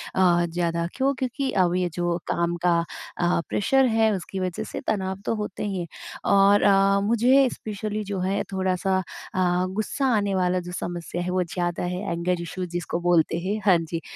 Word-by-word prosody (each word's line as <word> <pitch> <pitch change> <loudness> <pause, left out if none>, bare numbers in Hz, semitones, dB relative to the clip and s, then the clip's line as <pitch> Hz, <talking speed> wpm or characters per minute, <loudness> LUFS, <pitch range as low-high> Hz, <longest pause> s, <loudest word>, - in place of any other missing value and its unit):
अ, 175 -2 +4
ज़्यादा 170 0 -1
क्यों? 270 +1 +2
क्योंकि 265 +1 -2
अब 180 -2 +2
ये 180 -1 0
जो 175 0 0
काम 170 0 0
का 170 -1 +4 0.4
अ, 175 -1 +2
प्रेशर 270 +6 +3
है 225 -2 +3
उसकी 190 0 -4
वजह 185 -2 -2
से - - -6
तनाव 190 -3 -1
तो - - +1
होते 210 -2 -4
ही 195 -2 -2
हैं 170 - -4 0.4
और 200 +1 +5
अ, 195 0 +4
मुझे 245 +5 +4
स्पेशली 215 0 -4
जो 200 -1 -4
है 190 +2 0
थोड़ा-सा 190 0 0 0.4
अ, 180 -1 +2
गुस्सा 215 +8 -2
आने 200 -2 0
वाला 180 0 +1
जो - - -5
समस्या 175 0 -4
है 175 - -3
वो 185 0 +1
ज़्यादा 175 0 -2
है, 180 +1 -2
एंगर 170 +1 -1
इश्यू 180 +2 -4
जिसको 175 0 -3
बोलते 175 -2 +2
हैं, 195 +5 -2
हाँ 190 -4 +6
जी। 165 0 -4
185 Hz, 185 wpm, -25 LUFS, 175-205 Hz, 0.4 s, हाँ